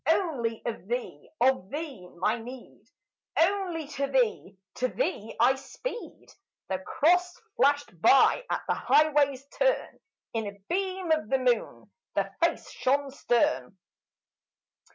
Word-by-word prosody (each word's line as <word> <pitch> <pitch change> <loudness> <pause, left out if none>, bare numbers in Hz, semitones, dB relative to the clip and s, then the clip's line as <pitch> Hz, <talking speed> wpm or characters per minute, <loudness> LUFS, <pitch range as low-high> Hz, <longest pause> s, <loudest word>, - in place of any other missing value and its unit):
Only 280 - 0
of 225 -5 -4
thee, 245 +2 -4
of 250 -7 +2
thee, 280 - -6
my 215 +6 +1
need! 245 +2 -11 0.5
Only 355 -2 +1
to 280 -2 -2
thee, 240 -7 0 0.2
to 255 - +1
thee, 225 - -3
I 260 - +6
speed!" 455 - -7 0.4
The 190 -1 -1
Cross 355 - +2 0.2
flashed 285 - +1
by 275 - +5
at - - -1
the - - +2
highway's 285 -3 +3
turn; - - 0 0.3
In 225 -2 -2
a 200 0 -8
beam 375 -1 -1
of 310 -9 +1
the 270 - +3
moon 250 -2 -1 0.2
the - - 0
Face - - 0
shone 275 +1 0
stern. 215 - 0
270 Hz, 130 wpm, -28 LUFS, 230-325 Hz, 0.5 s, I